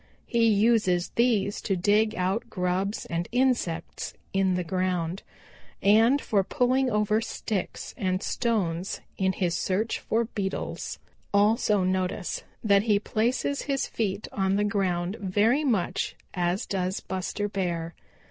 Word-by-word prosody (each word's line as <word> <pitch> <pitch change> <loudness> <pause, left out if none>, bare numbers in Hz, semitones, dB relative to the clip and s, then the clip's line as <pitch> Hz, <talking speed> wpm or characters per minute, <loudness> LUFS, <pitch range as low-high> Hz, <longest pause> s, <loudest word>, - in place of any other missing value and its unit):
He 230 -1 +2
uses 205 -4 +3
these 225 -4 +1
to 195 - 0
dig 210 +4 +2
out 190 +6 -1
grubs 185 +1 -1
and 170 0 -2
insects 240 -10 0 0.2
in 190 -1 +2
the 180 - -1
ground, 180 0 -1 0.6
and 225 +7 +5
for 205 -7 +1
pulling 255 +4 +2
over 210 0 +2
sticks 210 -4 -4
and 185 0 -1
stones 195 -7 -1 0.2
in 190 -1 +2
his 180 -3 0
search 210 +4 0
for 230 +1 0
beetles. 200 -4 -4 0.3
Also 205 -1 +3
notice 185 0 -1 0.2
that 200 -2 +5
he 210 -1 +3
places 240 +7 0
his 275 -1 +1
feet 205 -2 -2
on 195 -1 +1
the 205 - +2
ground 190 -2 0
very 210 +9 +2
much 225 -11 0 0.2
as 180 +3 0
does 190 -1 -1
Buster 190 +2 -3
Bear. 170 -4 -2
200 Hz, 130 wpm, -27 LUFS, 185-220 Hz, 0.6 s, and